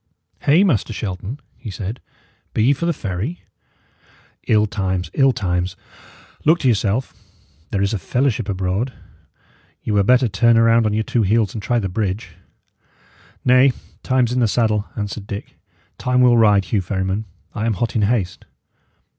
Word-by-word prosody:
"Hey, 160 +7 +4
Master 125 - +1
Shelton," 105 +5 -5 0.2
he 120 -3 -7
said, 100 +4 -5 0.5
"be 110 - +2
ye 135 +5 +5
for 170 +5 -3
the - - +3
ferry? 110 - -4 1.0
Ill 105 -1 +4
times, 95 -4 -2
ill 135 -1 +4
times! 90 -5 -2 0.7
Look 160 +3 +5
to 135 - +1
yourself. 115 +2 +1 0.6
There 100 -1 0
is 100 +2 0
a 105 - -1
fellowship 120 - 0
abroad. 95 +6 -1 0.9
Ye 110 - -2
were 100 - +4
better 125 +5 +4
turn 115 +3 +3
round 115 0 +4
on 105 - -1
your 110 - +1
two 120 - 0
heels 105 0 +2
and 110 - -5
try 120 +4 0
the 105 -4 0
bridge." 100 +2 -3 1.1
"Nay; 130 +1 +5 0.3
time's 130 -2 +1
in 125 - 0
the 120 - +3
saddle," 110 -1 +1
answered 105 -1 -5
Dick. 100 0 -7 0.4
"Time 125 0 +2
will 125 -1 +6
ride, 105 -4 +4
Hugh 100 +2 0
Ferryman. 95 +3 -2 0.3
I 110 0 -2
am 115 - +1
hot 105 +2 -2
in 110 - +2
haste." 100 -4 -1
110 Hz, 165 wpm, -20 LUFS, 100-125 Hz, 1.1 s, will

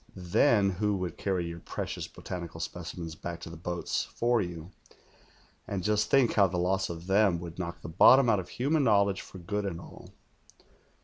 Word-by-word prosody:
Then 100 +3 +3
who 105 +2 0
would 90 -2 -4
carry 95 -3 -1
your 85 0 -6
precious - - -5
botanical 85 -2 -7
specimens 85 0 -6
back 85 +2 -6
to 85 - -8
the 85 - -9
lioats 85 +1 -2
for 120 0 0
you, 85 -1 -6 1.0
and 95 -3 -3
just 105 +2 +1
think 135 -4 +4
how 100 -2 +5
the 90 0 -3
loss 95 +2 0
of 85 0 -7
them 95 -2 +3
would 85 0 -8
knock 85 -1 -5
the - - -8
bottom 125 +10 +6
out 110 -4 +3
of 90 -1 -7
human 145 +4 +1
knowledge 100 -4 +3
for - - -12
good 100 +4 -3
and 90 -4 -4
all.' - - -12
90 Hz, 185 wpm, -29 LUFS, 85-105 Hz, 1.0 s, bottom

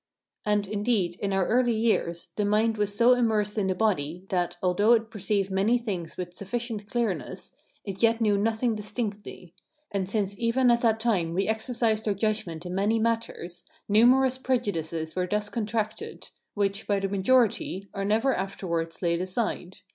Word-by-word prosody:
And, 210 -1 +2
indeed, 205 -3 0
in 200 - -2
our 195 -1 +2
early 240 +1 +2
years, 215 -6 0
the 210 - 0
mind 215 +2 +2
was 205 -1 +1
so 240 +3 +6
immersed 220 -4 +1
in 205 -3 0
the 185 - 0
body, 180 -4 -1
that, 175 -1 -1
although 205 +5 +4
it 225 -1 +1
perceived 200 -1 -1
many 200 +6 +3
things 195 -9 -5
with 175 -1 -5
sufficient 215 +2 -4
clearness, 235 -6 -3 0.3
it 195 -2 -5
yet 230 0 +4
knew 210 -3 +3
nothing 225 +3 +1
distinctly; 210 -4 -5 0.4
and 190 -2 -2
since 200 -2 -1
even 240 +2 +3
at 235 0 +2
that 225 -2 +2
time 185 -8 0
we 195 - +1
exercised 220 0 0
our 205 - +1
judgment 195 -6 -2
in 180 - -5
many 205 +4 +1
matters, 220 -6 -2 0.2
numerous 255 +5 +4
prejudices 165 -11 -2
were 180 0 0
thus 210 +2 0
contracted, 225 - -3 0.2
which, 200 -1 -1
by 200 -1 +2
the 195 - -1
majority, 200 -1 +1
are 195 - -3
never 225 +6 +2
afterwards 170 -3 -3
laid 170 0 +1
aside. 185 -1 -3
210 Hz, 165 wpm, -27 LUFS, 190-230 Hz, 0.4 s, so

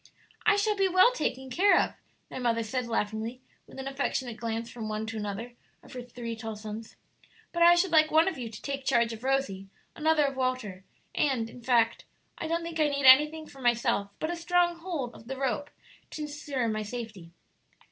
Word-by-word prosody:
"I 425 - +6
shall 415 +1 +1
be 390 -1 +3
well 370 +6 +6
taken 265 - -3
care 390 +9 +5
of," - - 0 0.4
their - - -6
mother 230 -2 +1
said, 245 +2 -3
laughingly, 225 +2 -2 0.3
with - - -14
an 265 0 -5
affectionate 260 -3 -2
glance 230 0 -3
from 225 -2 -6
one 215 +1 -2
to 225 0 -6
another 210 +3 -5 0.3
of - - -14
her 250 - -5
three 240 -1 -6
tall 225 -1 -6
sons; 215 +1 -8 0.6
"but 340 - -3
I 345 +1 +8
should 350 +1 +2
like 310 -1 +5
one 320 +2 +4
of 385 - 0
you 240 -3 -5
to 220 - -10
take 275 -1 -3
charge 235 -3 +2
of 225 +2 -10
Rosie, 260 -8 -1 0.3
another 310 -1 +3
of 275 -1 -2
Walter; 255 -8 -2 0.3
and, 245 -6 0
in 250 - -12
fact, 235 -2 +2 0.3
I - - -3
don't 335 +1 -1
think 335 -1 -5
I 305 - +4
need 280 -1 -1
anything 300 +4 +7
for 275 -3 -14
myself 235 -4 +1
but 315 - -2
a - - -2
strong 345 0 +1
hold 325 -9 -4
of 225 - -14
the 270 +1 -5
rope 275 +2 -1 0.4
to 305 - -5
insure 290 -4 -3
my 215 -1 -1
safety." 215 -5 -7
255 Hz, 205 wpm, -29 LUFS, 225-310 Hz, 0.6 s, I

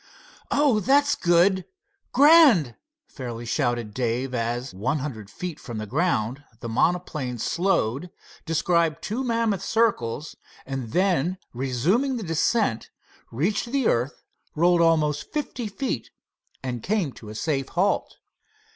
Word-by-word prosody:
"Oh, 280 -6 +3
that's 285 +7 +3
good—grand!" 250 - +4 0.3
fairly 120 -2 -7
shouted 120 -4 -1
Dave, 125 +2 -1
as, 120 +1 -2
one 115 +11 -1
hundred 120 -8 -6
feet 175 +6 -6
from 120 -4 -7
the 110 - -4
ground, 135 - 0 0.2
the - - -6
monoplane 135 0 0
slowed, 170 - 0 0.3
described 165 -1 +1
two 235 +6 -2
mammoth 230 -5 0
circles, 160 - 0 0.3
and 130 -4 -5
then 185 -1 +1 0.2
resuming 155 - 0
the 225 - -5
descent, 165 - 0 0.4
reached 185 - 0
the 275 -3 +1
earth, 125 +5 0 0.3
rolled 175 +2 +4
almost 155 -3 +2
fifty 260 -6 -3
feet, 205 - -3 0.5
and 125 -3 -3
came 195 - 0
to 105 - -12
a 105 - -8
safe 135 +2 -1
halt. 185 +4 0
165 Hz, 120 wpm, -25 LUFS, 125-205 Hz, 0.5 s, good—grand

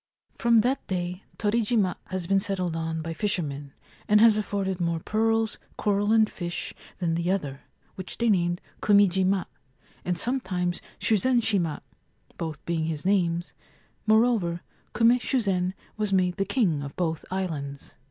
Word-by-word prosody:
From 235 -1 +5
that 255 +4 -1
day 180 0 -3
Torijima 210 -3 +1
has 185 -2 -3
been 195 +2 +3
settled 185 -4 -1
on 160 0 -2
by 165 0 -4
fisher 190 -1 -1
men, 140 -1 -6 0.4
and 210 0 +5
has 225 -1 +7
afforded 195 -3 -2
more 170 -1 0
pearls^ 225 +3 0 0.2
coral, 205 0 +1
and 220 -1 +5
fish 175 -4 -5 0.2
than 170 -3 0
the 170 +1 -1
other, 145 -8 -2 0.3
which 185 -1 -7
they 235 - +1
named 175 -4 +2 0.2
Kumijima, 195 -2 +4 0.6
and 180 -1 -1
sometimes 185 -6 -1 0.2
Shuzen 240 +4 +3
shima 175 -9 0 0.6
(both 160 -3 -5
being 165 -2 -1
his 160 -1 -3
names); 175 -3 +1 0.5
moreover, 215 -6 +3 0.3
Kume 235 +2 +5
Shuzen 190 -9 0 0.2
was 210 -2 -1
made 185 -1 +2
the 195 - +1
king 195 - +1
of 140 0 -7
both 165 -3 -1
islands. 150 -7 -4
185 Hz, 145 wpm, -26 LUFS, 170-210 Hz, 0.6 s, has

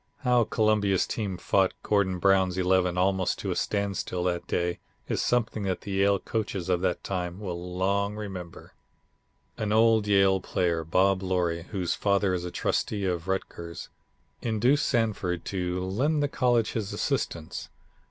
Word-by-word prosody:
How 125 -3 +3
Columbia's 105 -4 +2
team 100 -5 -3
fought 95 +1 +2
Gordon 100 -3 +1
Brown's 95 0 +3
Eleven 90 -1 +2
almost 95 0 +1
to - - -3
a - - -1
standstill 100 -3 -1
that 90 -1 -1
day 85 0 -1 0.3
is - - -1
something 115 -3 0
that 95 -2 -2
the 100 - -7
Yale 100 +1 +3
coaches 100 -3 -3
of 90 -1 +2
that 95 - -1
time 90 -1 -3
will 90 -3 -5
long 100 +2 +1
remember." 95 -5 -8 0.9
An 105 -1 -1
old 110 -1 +4
Yale 95 -1 +4
player, 85 -3 0
Bob 95 +4 +2
Loree, 90 -3 -1
whose 95 -4 -2
father 100 -2 +1
is 90 -1 -2
a - - -3
Trustee 100 +3 -1
of 90 -2 -2
Rutgers, 90 -2 -4 0.5
induced 120 +6 +2
Sanford 100 - 0
to 90 -1 -2
lend 145 +11 +1
the - - +2
college 120 -5 +1
his 105 -3 -3
assistance. 85 +1 -3
95 Hz, 150 wpm, -27 LUFS, 90-105 Hz, 0.9 s, old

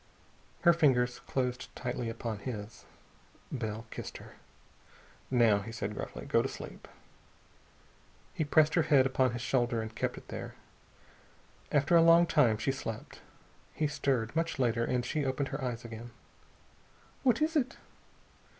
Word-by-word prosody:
Her 170 - +6
fingers 125 -7 +3
closed 125 -1 -2
tightly 125 -2 -3
upon 115 -2 -4
his. 105 -1 -7 0.7
Bell 110 -3 -4
kissed - - -6
her. - - -13 1.0
"Now," 115 -5 +4
he 110 +3 -7
said 105 -2 -4
gruffly, - - -6
"go - - +3
to - - -2
sleep." - - -9 1.5
He - - -1
pressed 155 +1 +4
her 170 - +4
head 145 -4 +4
upon 130 -1 +2
his 120 0 -4
shoulder 120 -1 +1
and 110 0 -5
kept - - -2
it - - -12
there. - - -6 1.2
After 145 +3 +3
a 165 - +8
long 165 +1 +7
time 115 -9 +3
she 135 - 0
slept. 115 -5 -6 0.5
He 155 - 0
stirred, 135 -4 -1
much 165 +1 0
later, 120 -3 +1
and 125 0 0
she 150 - -1
opened 135 +1 -1
her 135 - -4
eyes 120 -2 -3
again. 115 +1 -8 1.1
"What 250 -4 +3
is 315 +1 +1
it?" 275 -3 +1
125 Hz, 150 wpm, -31 LUFS, 115-150 Hz, 1.5 s, a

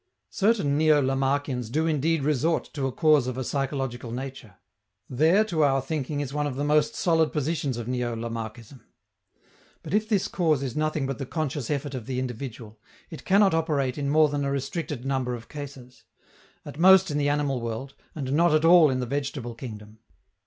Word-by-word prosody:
Certain 195 -9 +1
neo 155 -1 +5
Lamarckians 135 -2 -1
do 155 +6 0
indeed 160 0 +1
resort 150 +3 0
to 140 -3 -1
a - - -3
cause 150 -2 +3
of 130 -1 -4
a 130 - -2
psychological 135 -3 -3
nature. 125 -4 -7 0.5
There, 160 - +3
to 165 -7 0
our 135 -1 +3
thinking, 145 +1 -3
is 140 -2 -5
one 150 0 0
of 135 - -4
the 140 - -2
most 150 +1 +2
solid 160 -3 +2
positions 150 -3 -2
of 120 -1 -5
neo 125 -2 -2
Lamarckism. 115 +1 -7 1.0
But - - -6
if 215 +1 +1
this 205 -4 +1
cause 155 -6 +1
is 130 -3 -4
nothing 155 -2 -1
but 135 0 -4
the 135 - -4
conscious 145 -5 -3
effort 145 -1 -2
of 125 -3 -6
the 130 -1 -3
individual, 120 -3 -6 0.3
it 160 - -9
cannot 195 0 +4
operate 145 -6 0
in 140 -1 -2
more 155 +1 +5
than 145 -1 -2
a 140 - -1
restricted 140 -1 -4
number 130 -2 -1
of 115 -1 -11
cases 135 -4 -10 0.6
at 145 - -9
most 190 0 +6
in 145 - -1
the 145 0 +1
animal 145 -3 0
world, 115 +4 -5 0.2
and 135 -3 -3
not 170 +1 +4
at 155 +1 +2
all 170 -2 +7
in 130 -1 -1
the - - -2
vegetable 135 -2 -4
kingdom. 110 -3 -10
140 Hz, 190 wpm, -26 LUFS, 125-155 Hz, 1.0 s, all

